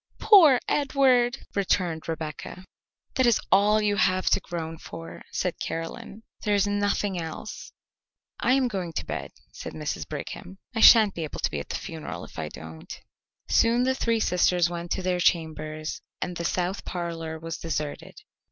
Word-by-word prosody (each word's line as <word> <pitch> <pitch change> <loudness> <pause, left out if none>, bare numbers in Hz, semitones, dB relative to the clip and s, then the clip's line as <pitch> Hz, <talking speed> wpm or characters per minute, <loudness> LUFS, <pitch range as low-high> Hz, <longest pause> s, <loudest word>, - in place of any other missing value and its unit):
"Poor 335 - +7
Edward," 265 -4 +2
returned 180 -5 0
Rebecca. 160 +3 -5 0.5
"That 260 -3 +3
is 235 - +4
all 205 +2 +5
you 205 -1 +1
have 185 0 +2
to - - +4
groan 165 -2 -6
for," 165 0 -9
said 180 - -2
Caroline. 165 +6 -5 0.2
"There 210 -1 +1
is 200 0 +3
nothing 205 -2 0
else." 165 +6 -7 0.7
"I 255 - +3
am 265 -1 +3
going 185 -7 -4
to - - -3
bed," - - -4 0.2
said - - -8
Mrs. 150 -1 -4
Brigham. 180 +5 -7 0.2
"I 225 - -2
sha'n't 220 -2 +8
be 165 - -4
able 155 - -6
to - - 0
be 75 - -2
at 70 - -8
the - - -3
funeral - - -6
if - - -11
I - - -3
don't." 80 0 -10 0.5
Soon 235 +2 +3
the 260 +1 +2
three 230 -3 0
sisters 180 -3 +2
went 170 0 -5
to 190 - -4
their 180 -1 0
chambers 155 -2 -1 0.2
and 180 - -3
the 170 - -4
south 180 +3 -1
parlour 165 -2 -4
was 165 0 -6
deserted. 155 -3 -4
180 Hz, 170 wpm, -26 LUFS, 165-215 Hz, 0.7 s, sha'n't